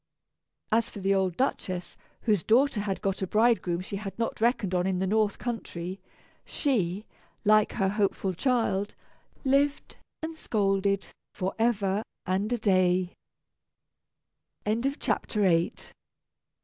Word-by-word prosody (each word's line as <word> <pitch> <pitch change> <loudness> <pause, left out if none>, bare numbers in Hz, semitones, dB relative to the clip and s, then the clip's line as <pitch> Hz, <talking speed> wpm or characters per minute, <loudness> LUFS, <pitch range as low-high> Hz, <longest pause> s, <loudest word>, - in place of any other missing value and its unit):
As 225 +1 +2
for - - -11
the 195 0 +1
old 190 -3 +1
Duchess 185 -8 -2 0.3
(whose 210 -6 +2
daughter 240 - +3
had 200 -2 -3
got 195 0 -1
a 190 - -1
bridegroom 215 -5 +2
she 200 +2 -5
had 195 -1 -6
not 230 -1 -2
reckoned 225 -5 +2
on 180 0 +1
in 190 -1 0
the 190 - 0
northern 210 +1 +1
country), 190 -6 -5 0.4
she, 210 - -1 0.4
like 215 0 +5
her 195 -4 +1
hopeful 195 -1 0
child, 220 -2 0 0.5
lived 280 +2 +1 0.3
and 320 0 -4
scolded 200 -7 0 0.3
forever 200 0 0 0.2
and 190 +4 0
a 245 - +2
day. 185 -4 +2
200 Hz, 115 wpm, -28 LUFS, 190-230 Hz, 0.5 s, like